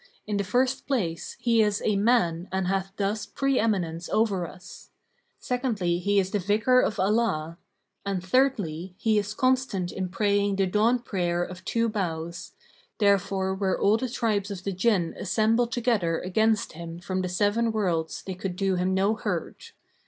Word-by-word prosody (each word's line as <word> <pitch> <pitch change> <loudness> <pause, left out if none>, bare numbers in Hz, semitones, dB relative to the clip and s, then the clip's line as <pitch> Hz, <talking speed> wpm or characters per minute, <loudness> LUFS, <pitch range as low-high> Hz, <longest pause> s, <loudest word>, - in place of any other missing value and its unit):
In 210 -1 -2
the 200 - 0
first 255 +6 0
place, 185 - -2
he 230 -2 +3
is 210 -1 +2
a 215 - +2
man 195 -5 +2
and 190 0 -1
hath 195 +1 -1
thus 205 +1 -1
pre 275 +5 0
eminence 175 -6 -1
over 200 -6 +1
us[FN#541]; 180 - -13 0.5
secondly 220 -9 -1
he 200 +2 +1
is 190 -1 +2
the 205 - 0
Vicar 215 +7 +3
of 220 - 0
Allah; 185 -5 0 0.4
and 195 -2 -3
thirdly, 190 - 0
he 220 -2 +2
is 205 +1 -4
constant 255 -9 +1
in 185 -1 -3
praying 200 +1 +1
the 195 0 +2
dawn 215 +6 +3
prayer 175 -7 -1
of 180 +1 -8
two 230 0 0
bows[FN#542]; 170 -4 -4 0.4
therefore 195 -2 +2
were 190 -1 -1
all 210 +2 +4
the 255 +1 -3
tribes 215 -4 -1
of 190 -3 -6
the 200 - -2
Jinn 185 -3 +1
assembled 230 +2 +1
together 225 -10 +1
against 220 +4 +1
him 165 +1 -7
from 185 +1 -3
the 185 - -2
Seven 205 +5 +1
Worlds 175 -7 -1
they 190 - -5
could 185 0 -5
do 190 0 0
him 185 +1 +1
no 195 +3 +2
hurt. 460 - -4
200 Hz, 170 wpm, -26 LUFS, 180-225 Hz, 0.5 s, all